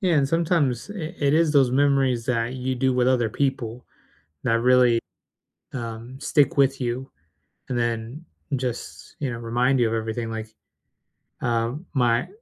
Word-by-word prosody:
Yeah, 185 Hz, -4 st, +2 dB
and 140 Hz, -3 st, +3 dB
sometimes 165 Hz, -, +1 dB
it 170 Hz, -6 st, -5 dB
it 145 Hz, 0 st, +2 dB
is 160 Hz, -2 st, +3 dB
those 135 Hz, -4 st, +4 dB
memories 135 Hz, -3 st, +2 dB
that 120 Hz, -1 st, 0 dB
you 130 Hz, 0 st, -2 dB
do 130 Hz, +1 st, +1 dB
with 125 Hz, 0 st, +2 dB
other 120 Hz, -4 st, +2 dB
people 125 Hz, -3 st, -2 dB, 0.6 s
that 115 Hz, 0 st, +2 dB
really, 125 Hz, -2 st, +5 dB, 0.7 s
um, 120 Hz, +1 st, -6 dB
stick 145 Hz, -1 st, +2 dB
with 135 Hz, -1 st, +3 dB
you, 125 Hz, +2 st, -3 dB, 0.6 s
and 125 Hz, -, -1 dB
then 120 Hz, +6 st, -2 dB, 0.3 s
just, 125 Hz, -2 st, -5 dB
you 135 Hz, -4 st, -2 dB
know, 115 Hz, -, -4 dB
remind 120 Hz, +3 st, +1 dB
you 120 Hz, -, +3 dB
of 110 Hz, -, -2 dB
everything. 115 Hz, +1 st, -2 dB
Like, 110 Hz, -1 st, -5 dB, 0.9 s
um, 120 Hz, +7 st, -1 dB
my 120 Hz, -3 st, +2 dB
125 Hz, 155 wpm, -24 LUFS, 115-140 Hz, 0.9 s, really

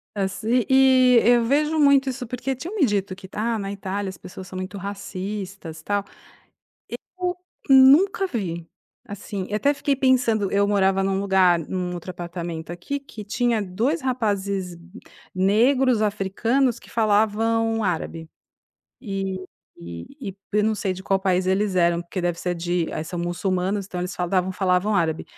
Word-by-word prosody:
Assim 215 Hz, +5 st, 0 dB
e 260 Hz, -2 st, +6 dB
eu 240 Hz, 0 st, +5 dB
vejo 300 Hz, +5 st, +1 dB
muito 280 Hz, -2 st, +5 dB
isso 255 Hz, 0 st, -5 dB
porque 250 Hz, +3 st, -3 dB
tinham 345 Hz, -, -7 dB
me 355 Hz, -9 st, +4 dB
dito 200 Hz, -4 st, -1 dB
que: 185 Hz, 0 st, -12 dB
"Ah, 225 Hz, +1 st, -1 dB
na 195 Hz, -1 st, -4 dB
Itália, 200 Hz, 0 st, -4 dB
as 190 Hz, -, -9 dB
pessoas 185 Hz, +2 st, -10 dB
são 185 Hz, -, -8 dB
muito 185 Hz, +2 st, -5 dB
racistas, 195 Hz, -3 st, -6 dB
tal". 205 Hz, +2 st, -1 dB, 1.2 s
Eu 360 Hz, 0 st, -1 dB, 0.3 s
nunca 280 Hz, +9 st, +6 dB
vi, 170 Hz, -, -4 dB, 0.4 s
assim. 200 Hz, -1 st, -6 dB
Eu 210 Hz, -, 0 dB
até 280 Hz, +7 st, +2 dB
fiquei 285 Hz, -1 st, 0 dB
pensando, 250 Hz, -6 st, +2 dB
eu 200 Hz, 0 st, +3 dB
morava 195 Hz, -1 st, +2 dB
num 195 Hz, 0 st, 0 dB
lugar, 190 Hz, -3 st, +4 dB
num 180 Hz, +2 st, -4 dB
outro 175 Hz, +1 st, -7 dB
apartamento 170 Hz, -2 st, -6 dB
aqui, 180 Hz, +12 st, -4 dB
que 275 Hz, -7 st, -10 dB
tinha 235 Hz, +2 st, 0 dB
dois 220 Hz, -, -1 dB
rapazes 200 Hz, -8 st, -2 dB, 0.6 s
negros, 235 Hz, +6 st, +3 dB
africanos, 215 Hz, +5 st, 0 dB
que -, -, -18 dB
falavam 225 Hz, +1 st, +1 dB
árabe. 165 Hz, -3 st, -3 dB, 0.7 s
E 195 Hz, -4 st, -3 dB, 0.5 s
e 85 Hz, 0 st, -7 dB, 0.2 s
e 195 Hz, -, -5 dB, 0.2 s
p 210 Hz, -, +1 dB
eu 210 Hz, -, +3 dB
não 220 Hz, 0 st, +2 dB
sei 200 Hz, -2 st, -2 dB
de 185 Hz, +1 st, -8 dB
qual 195 Hz, 0 st, +1 dB
país 185 Hz, -1 st, +1 dB
eles 190 Hz, +1 st, +1 dB
eram, 170 Hz, -1 st, +2 dB
porque 175 Hz, +2 st, -5 dB
deve 175 Hz, -1 st, -1 dB
ser 180 Hz, -1 st, -2 dB
de 175 Hz, 0 st, -1 dB
a -, -, -3 dB
são 175 Hz, +2 st, -6 dB
muçulmanos, 185 Hz, +3 st, -1 dB
então 180 Hz, -, -6 dB
eles 180 Hz, -, -4 dB
falavam 180 Hz, +1 st, 0 dB
da 185 Hz, -, -8 dB
falavam 190 Hz, +2 st, +1 dB
árabe. 165 Hz, -3 st, 0 dB
200 Hz, 165 wpm, -23 LUFS, 185-235 Hz, 1.2 s, e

